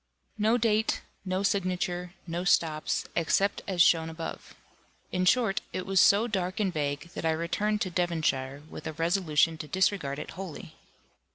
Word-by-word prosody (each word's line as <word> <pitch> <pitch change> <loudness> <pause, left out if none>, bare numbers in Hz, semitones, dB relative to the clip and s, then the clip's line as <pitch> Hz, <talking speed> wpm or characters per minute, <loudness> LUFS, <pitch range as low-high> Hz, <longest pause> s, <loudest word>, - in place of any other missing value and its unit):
No 220 +3 +3
date, 220 -2 +1 0.2
no 185 +1 -1
signature, 180 -2 -1
no 170 0 -3
stops, 160 -4 +1
except 195 +4 +1
as 180 -3 +4
shown 165 -2 +3
above. 165 0 -7 0.6
In 185 0 0
short, 215 -1 +3
it 185 - -3
was 195 -1 +2
so 200 +2 +5
dark 190 -3 -2
and 195 -4 0
vague, 145 +2 -3
that - - -5
I 165 - +2
returned 200 +6 0
to 185 -5 -1
Devonshire, 155 -6 -1
with 160 - -8
a 160 - -4
resolution 165 -1 +1
to 150 - -6
disregard 185 -6 0
it - - -6
wholly. 185 -4 -8
180 Hz, 160 wpm, -28 LUFS, 160-195 Hz, 0.6 s, so